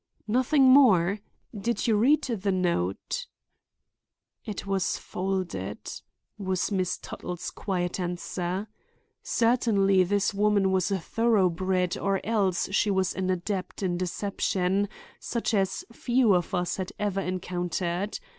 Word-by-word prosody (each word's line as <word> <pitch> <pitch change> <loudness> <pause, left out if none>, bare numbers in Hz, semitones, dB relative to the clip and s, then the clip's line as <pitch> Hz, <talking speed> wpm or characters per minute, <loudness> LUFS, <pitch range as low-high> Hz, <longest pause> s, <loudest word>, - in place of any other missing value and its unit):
"Nothing 255 +5 +3
more? 215 -8 +6 0.4
Did 215 +2 -1
you 225 - +3
read 260 +9 +4
the 210 -6 -1
note?" 170 - -1 1.2
"It 210 -2 -5
was 195 -2 0
folded," 180 - -3 0.6
was 190 0 -1
Miss 185 -2 0
Tuttle's 180 -1 -6
quiet 180 -2 -2
answer. 180 +2 -3 0.5
Certainly 205 -5 +3
this 205 +3 +1
woman 200 -1 +2
was 185 0 +1
a 195 - +1
thoroughbred 185 -4 +1
or 195 -1 +1
else 200 -5 +1
she 210 - +3
was 190 -2 +1
an 185 0 -2
adept 185 +1 -3
in 180 -2 0
deception 190 +1 -1 0.3
such 235 -1 -2
as 195 -2 0
few 240 -2 +2
of 180 +1 0
us 180 0 -1
had 185 -1 -4
ever 200 -2 -1
encountered. 180 +1 -2
190 Hz, 120 wpm, -27 LUFS, 180-210 Hz, 1.2 s, more